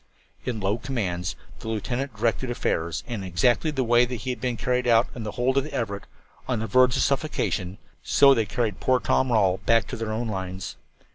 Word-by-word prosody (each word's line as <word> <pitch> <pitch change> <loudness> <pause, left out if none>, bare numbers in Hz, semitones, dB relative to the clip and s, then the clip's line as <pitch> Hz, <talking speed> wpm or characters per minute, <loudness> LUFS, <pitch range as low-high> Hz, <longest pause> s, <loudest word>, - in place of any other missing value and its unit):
In 120 -3 -2
low 100 +3 0
commands 95 -10 -2 0.2
the - - -9
lieutenant 120 +4 -2
then 105 - -15
directed 120 +2 0
affairs, 85 -9 -1
and 115 -4 -4
in 95 - -5
exactly 120 - +2
the 140 -4 0
way 120 0 +5
that 125 0 -2
he 130 +3 -3
had 125 - -6
been 125 -2 -1
carried 125 +1 0
out 115 0 +5
of 120 - -6
the 105 - -5
hold 130 +2 +2
of - - -2
the 150 - -8
Everett 100 -4 -3 0.4
on 125 - 0
the 110 - -2
verge 125 +3 +4
of - - +2
suffocation, 110 - -1 0.2
so 140 +10 +6
they 115 -5 0
carried 110 -1 -1
poor 130 0 +3
Tom 130 +3 +1
Rawle 95 -5 +3
back 115 -1 +4
to - - -4
their 115 -2 -4
own 115 +2 -2
lines. 95 -2 -5
115 Hz, 220 wpm, -25 LUFS, 100-125 Hz, 0.4 s, so